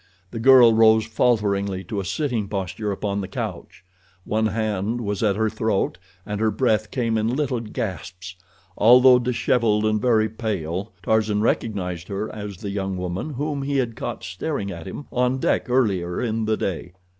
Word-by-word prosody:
The 115 Hz, -, -5 dB
girl 125 Hz, -1 st, +7 dB
rose 110 Hz, 0 st, +5 dB
falteringly 100 Hz, -4 st, 0 dB
to 100 Hz, +3 st, -4 dB
a 95 Hz, -, -4 dB
sitting 120 Hz, -, -1 dB
posture 100 Hz, +1 st, -3 dB
upon 100 Hz, 0 st, -2 dB
the 95 Hz, -, -5 dB
couch. 90 Hz, -, -6 dB, 0.4 s
One 110 Hz, +1 st, +1 dB
hand 110 Hz, +1 st, -1 dB
was 105 Hz, -3 st, -3 dB
at 105 Hz, -3 st, +2 dB
her 110 Hz, +1 st, +1 dB
throat, 110 Hz, -4 st, -1 dB, 0.3 s
and 105 Hz, 0 st, -4 dB
her 110 Hz, -, +3 dB
breath 110 Hz, -1 st, +1 dB
came 115 Hz, -4 st, 0 dB
in 115 Hz, +3 st, 0 dB
little 135 Hz, -4 st, -1 dB
gasps. 95 Hz, -4 st, -6 dB, 0.4 s
Although 125 Hz, +3 st, +7 dB
disheveled 115 Hz, -3 st, +1 dB
and 110 Hz, -1 st, +1 dB
very 110 Hz, -3 st, +3 dB
pale, 100 Hz, -4 st, -4 dB
Tarzan 110 Hz, -1 st, +1 dB
recognized 90 Hz, -6 st, -1 dB
her 100 Hz, +2 st, -4 dB
as 105 Hz, -3 st, -7 dB
the 100 Hz, +3 st, -5 dB
young 95 Hz, -1 st, -3 dB
woman 90 Hz, -, -4 dB
whom 145 Hz, +1 st, -2 dB
he 140 Hz, 0 st, -1 dB
had 120 Hz, -4 st, -1 dB
caught -, -, -5 dB
staring 100 Hz, -, -4 dB
at 85 Hz, -2 st, -8 dB
him 140 Hz, +9 st, -7 dB
on 125 Hz, +1 st, +1 dB
deck 130 Hz, -, 0 dB
earlier 95 Hz, -9 st, +1 dB
in 115 Hz, -2 st, -1 dB
the 110 Hz, 0 st, +1 dB
day. 90 Hz, -1 st, -4 dB
110 Hz, 170 wpm, -23 LUFS, 100-115 Hz, 0.4 s, girl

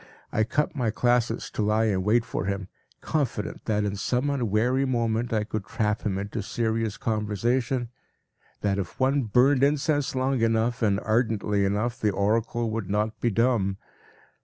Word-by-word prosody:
I 110 Hz, -, +2 dB
cut 150 Hz, +6 st, 0 dB
my 125 Hz, -5 st, 0 dB
classes 120 Hz, 0 st, +1 dB
to -, -, -3 dB
lie 105 Hz, +1 st, +2 dB
in 100 Hz, -4 st, +1 dB
wait 115 Hz, +4 st, +2 dB
for -, -, -3 dB
him, 100 Hz, -1 st, -3 dB, 0.3 s
confident 135 Hz, -9 st, -2 dB
that 105 Hz, -2 st, +1 dB
in 100 Hz, -1 st, -2 dB
some 125 Hz, +7 st, 0 dB
unwary 125 Hz, +1 st, +1 dB
moment 120 Hz, -2 st, 0 dB
I 110 Hz, -2 st, +1 dB
could 105 Hz, -1 st, -4 dB
trap 105 Hz, 0 st, -1 dB
him 100 Hz, -3 st, -1 dB
into 100 Hz, +3 st, -3 dB
serious 110 Hz, +1 st, -1 dB
conversation, 115 Hz, +3 st, -1 dB, 0.7 s
that 100 Hz, -1 st, 0 dB
if 95 Hz, -, -6 dB
one 135 Hz, +2 st, +3 dB
burned 125 Hz, +5 st, +4 dB
incense 145 Hz, -1 st, +1 dB
long 130 Hz, -1 st, +1 dB
enough 115 Hz, +2 st, +1 dB
and 100 Hz, -3 st, +2 dB
ardently 110 Hz, -3 st, +1 dB
enough, 110 Hz, +5 st, -1 dB
the 105 Hz, -, +3 dB
oracle 110 Hz, +3 st, 0 dB
would 110 Hz, -4 st, -3 dB
not 105 Hz, +2 st, -1 dB
be 120 Hz, -, +1 dB
dumb. 115 Hz, -4 st, +1 dB
115 Hz, 160 wpm, -26 LUFS, 105-125 Hz, 0.7 s, burned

